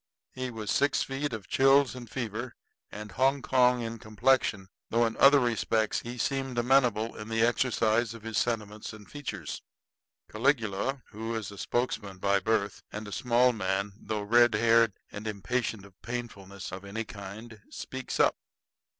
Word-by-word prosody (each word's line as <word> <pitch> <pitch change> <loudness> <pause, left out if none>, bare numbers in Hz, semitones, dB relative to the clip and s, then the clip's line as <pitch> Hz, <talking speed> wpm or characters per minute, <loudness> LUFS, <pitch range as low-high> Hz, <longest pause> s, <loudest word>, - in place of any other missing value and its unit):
He 130 0 -4
was 110 -3 -4
six 140 0 +2
feet 135 +2 -3
of 110 -4 -6
chills 135 0 +4
and 120 -3 -9
fever, 120 0 -4 0.4
and 105 -1 -8
Hongkong 130 -2 +3
in 115 0 -5
complexion 110 -2 +1 0.2
though 115 +1 +3
in 115 - -2
other 140 +1 +7
respects 115 -3 +1
he 120 +1 -7
seemed 135 -1 -1
amenable 120 -3 +3
in 105 - -7
the 115 0 +2
exercise 120 -2 +1
of 115 - -12
his 115 -2 -1
sentiments 110 -2 -3
and 105 -2 -12
features. 145 -2 -6 0.7
Caligula, 120 +1 0
who 115 +2 -4
is 110 -3 -4
a 100 - -11
spokesman 105 -5 -2
by 100 +1 +2
birth, 105 0 0
and 105 0 -6
a - - -8
small 125 +3 +3
man, 100 -1 -1
though 105 -1 -4
red 120 +2 +5
haired 115 -1 +4 0.2
and 105 +2 -7
impatient 110 0 -2
of 100 -1 -19
painfulness 100 -6 -6
of 95 +1 -7
any 100 +3 -4
kind, 105 +2 -9
speaks 130 0 -6
up. - - +4
115 Hz, 160 wpm, -29 LUFS, 105-125 Hz, 0.7 s, other